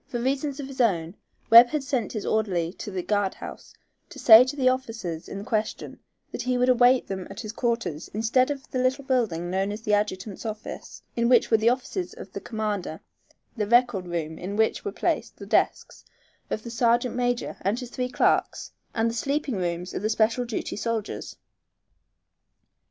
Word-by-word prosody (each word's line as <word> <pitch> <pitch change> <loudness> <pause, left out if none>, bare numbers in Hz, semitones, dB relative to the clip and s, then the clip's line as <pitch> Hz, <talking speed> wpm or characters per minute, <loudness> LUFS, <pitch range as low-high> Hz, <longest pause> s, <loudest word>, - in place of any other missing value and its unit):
For 240 - -4
reasons 275 +3 -1
of 280 - -4
his 270 -1 -3
own, 170 -7 +1 0.4
Webb 235 +2 +11
had 295 +2 -2
sent 260 -6 -2
his 215 -3 -4
orderly 185 -6 0
to 210 - -7
the 185 -3 -4
guard 205 -1 0
house - - -10 0.3
to - - -12
say 225 +1 +9
to 260 +3 -4
the 265 -3 +1
officers 225 -10 -2
in 200 +1 -6
question 215 -2 -3 0.3
that - - -4
he 250 0 0
would 250 +1 +2
await 250 +1 +5
them 190 -2 -5
at 195 - -7
his 215 -3 -6
quarters 230 - -2
instead 230 +5 +2
of 285 +1 -5
the 255 - -1
little 255 +2 +1
building 215 -11 0
known 195 +2 0
as 210 +2 -6
the 210 -3 0
adjutant's 205 -1 -1
office, 215 -2 -7
in 235 0 +1
which 250 - +4
were 225 - +6
the 220 +2 +3
offices 270 +9 -3
of - - -10
the - - -5
commander, 210 -7 -3 0.6
the 210 -3 -2
record 240 -5 +3
room 160 -2 -4
in 195 +3 -5
which 220 +1 +1
were 410 - -3
placed - - -2
the - - -9
desks - - 0 0.5
of 215 - -3
the 235 - -7
sergeant 235 +1 +2
major 245 0 -1
and 205 +5 0
his 250 -2 -8
three 250 0 -2
clerks, - - +1 0.2
and 225 0 +2
the 230 - -1
sleeping 275 +2 -1
rooms 175 0 -3
of - - -3
the 215 - 0
special 225 +3 +1
duty 235 -2 -4
soldiers. 225 -1 -4
230 Hz, 190 wpm, -25 LUFS, 200-250 Hz, 0.6 s, Webb